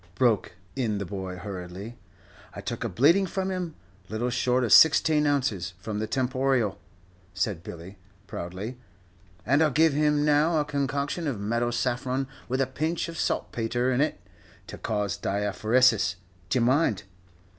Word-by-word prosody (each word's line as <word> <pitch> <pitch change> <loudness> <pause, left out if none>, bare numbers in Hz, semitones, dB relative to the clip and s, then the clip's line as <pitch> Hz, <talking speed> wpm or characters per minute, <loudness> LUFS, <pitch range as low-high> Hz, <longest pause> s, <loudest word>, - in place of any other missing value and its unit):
broke 115 -4 +2 0.2
in 115 -6 -1
the 100 - -3
boy, 95 -1 -5
hurriedly. 95 +3 -7 0.6
"I - - -6
took - - -4
a - - -2
bleeding 170 +10 +4
from 190 +2 -2
him, 180 -4 -4 0.3
little 120 +3 -2
short 125 +1 +1
of 120 - +3
sixteen 155 -1 +6
ounces, 110 -12 0
from 105 +2 -5
the 110 - -2
temporial," 130 -3 0 0.6
said 100 -7 -1
Billy, 90 +3 -10 0.3
proudly, 95 +7 -6 0.7
"and 140 +6 +3
I'll 155 - +4
give 155 +2 +3
him 150 0 +2
now 150 +2 +3
a 150 - 0
concoction 140 +3 -2
of 125 -8 -2
meadow 115 +4 0
saffron 125 +2 -1 0.2
with 130 +2 0
a - - +3
pinch 155 +7 -2
of 165 - -7
saltpetre 120 +2 -1
in 125 +2 +2
it, 155 - 0 0.5
to - - -9
cause 105 -2 -2
diaphoresis, 105 0 +2 0.3
d'ye 105 - +2
mind? 125 - +2
125 Hz, 150 wpm, -27 LUFS, 105-145 Hz, 0.7 s, sixteen